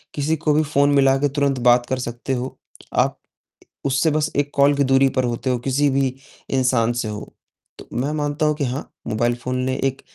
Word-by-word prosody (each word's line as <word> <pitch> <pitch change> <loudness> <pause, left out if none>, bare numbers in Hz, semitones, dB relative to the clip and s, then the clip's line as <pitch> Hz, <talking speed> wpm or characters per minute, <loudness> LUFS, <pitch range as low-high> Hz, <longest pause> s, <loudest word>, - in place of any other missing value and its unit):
किसी 150 +2 0
को 150 -1 +1
भी 155 - +3
फ़ोन 145 -1 +2
मिलाकर 135 +1 +4
तुरंत 140 -2 0
बात 120 0 +4
कर 130 - -2
सकते 120 +2 -4
हो। 130 +1 -4 0.4
आप - - +1 0.7
उससे 140 +4 +2
बस 155 +1 0
एक 145 0 0
कॉल 140 +1 +4
की 140 - +2
दूरी 135 0 +4
पर 130 - +3
होते 120 +2 -2
हो, 125 - +1
किसी 140 +3 +1
भी 135 -1 0 0.4
इंसान 125 -3 +2
से 120 -2 -2
हो। 105 0 -7 0.5
तो - - -11
मैं 135 +5 -1
मानता 150 +1 -1
हूँ 150 -1 +2
कि 145 -3 -1
हाँ, 130 +3 -4 0.2
मोबाइल 120 +2 0
फ़ोन 125 +1 -4
ने 130 - -1
एक 135 -1 -1
135 Hz, 205 wpm, -21 LUFS, 125-145 Hz, 0.7 s, मिलाकर